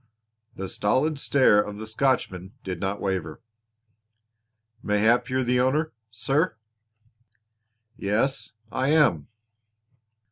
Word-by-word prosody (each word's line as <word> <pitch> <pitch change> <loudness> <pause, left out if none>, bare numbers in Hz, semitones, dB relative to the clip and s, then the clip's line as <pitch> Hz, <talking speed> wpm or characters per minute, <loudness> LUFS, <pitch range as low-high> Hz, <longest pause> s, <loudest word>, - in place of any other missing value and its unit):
The 95 - -5
stolid 135 +11 0
stare 130 -8 +4
of 105 0 -6
the 110 - -6
Scotchman 110 -6 -1
did 90 -3 -4
not 95 +3 -2
waver. 95 -6 -3 1.4
"Mayhap 110 +5 +2
you're 130 0 0
the 125 0 +1
owner, 145 +5 +1 0.2
sir." 135 +10 0 1.4
"Yes, 115 +7 -1 0.2
I 130 +1 -1
am." 145 - +3
115 Hz, 100 wpm, -25 LUFS, 100-135 Hz, 1.4 s, stare